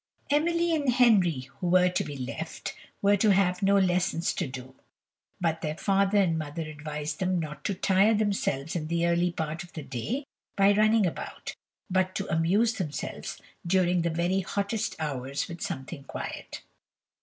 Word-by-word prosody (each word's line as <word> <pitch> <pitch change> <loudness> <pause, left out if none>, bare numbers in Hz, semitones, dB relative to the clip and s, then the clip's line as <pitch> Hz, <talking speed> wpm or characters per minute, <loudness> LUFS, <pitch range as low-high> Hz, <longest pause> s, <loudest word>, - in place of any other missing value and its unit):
Emily 335 +3 +2
and 285 -4 +1
Henry, 205 - +4 0.2
who 180 - -2
were 180 +1 +5
to 180 - 0
be 145 - -6
left, 140 +5 -5 0.3
were 200 +1 +5
to 215 +2 +3
have 180 -2 +2
no 200 0 +4
lessons 180 -3 +1
to - - -2
do, 130 0 -8 0.7
but 165 -2 0
their 155 -1 -3
father 195 +1 +2
and 170 -5 +3
mother 155 +2 -4
advised 150 -1 -5
them 185 -1 +1
not 150 -3 -6
to 200 - 0
tire 195 +4 +4
themselves 195 -9 -1
in 155 -3 -2
the 170 +1 +1
early 170 +1 +2
part 160 +1 -3
of 175 - -16
the 155 - -6
day 135 - -3 0.3
by 200 +1 +6
running 215 0 +4
about, 175 - -5 0.3
but 185 -1 +1
to 195 - -2
amuse 195 +9 +3
themselves 155 -9 -5 0.2
during 180 0 +2
the 170 - 0
very 175 +3 +1
hottest 200 +3 -2
hours 140 -3 -3
with 170 -2 -8
something 135 +2 -5
quiet. - - -6
180 Hz, 165 wpm, -28 LUFS, 155-200 Hz, 0.7 s, by